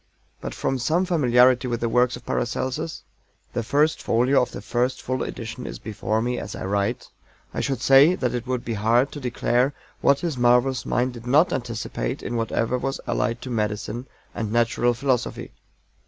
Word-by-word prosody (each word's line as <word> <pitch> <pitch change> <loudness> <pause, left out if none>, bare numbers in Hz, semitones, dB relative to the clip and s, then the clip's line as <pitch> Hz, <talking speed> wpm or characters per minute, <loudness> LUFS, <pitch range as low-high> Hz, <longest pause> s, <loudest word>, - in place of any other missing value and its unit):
But - - -5
from 135 - -1
some 165 +9 +1
familiarity 125 -6 +4
with 120 -1 -2
the 120 - 0
works 125 +2 +2
of 125 - -12
PARACELSUS 130 +7 -2 0.5
the - - -1
first 145 +7 +1
folio 125 +4 +3
of 125 - -2
the - - -6
first 120 +5 -1
full 130 +1 -3
edition 115 +1 -5
is - - -6
before 110 +1 -2
me 125 0 -1
as - - -6
I - - -5
write 100 +1 -1 0.5
I - - -2
would 135 -4 -2
say 135 +7 +6
that 125 -7 -1
it 125 0 -4
would 125 -1 -2
be 115 - -2
hard 115 +6 +2
to 145 - -7
declare 125 +1 0 0.2
what 140 0 +3
his 160 -7 -2
marvelous 125 +1 +3
mind 125 +1 0
did 120 0 -10
not 150 +8 +4
anticipate 115 - -3
in 120 - -3
whatever 115 +2 0
was 135 +2 -3
allied 115 -1 -1
to 130 - -6
medicine 110 +2 -2 0.3
and 110 -2 -3
natural 120 +1 +2
philosophy. 130 -1 -1
125 Hz, 185 wpm, -24 LUFS, 115-130 Hz, 0.5 s, say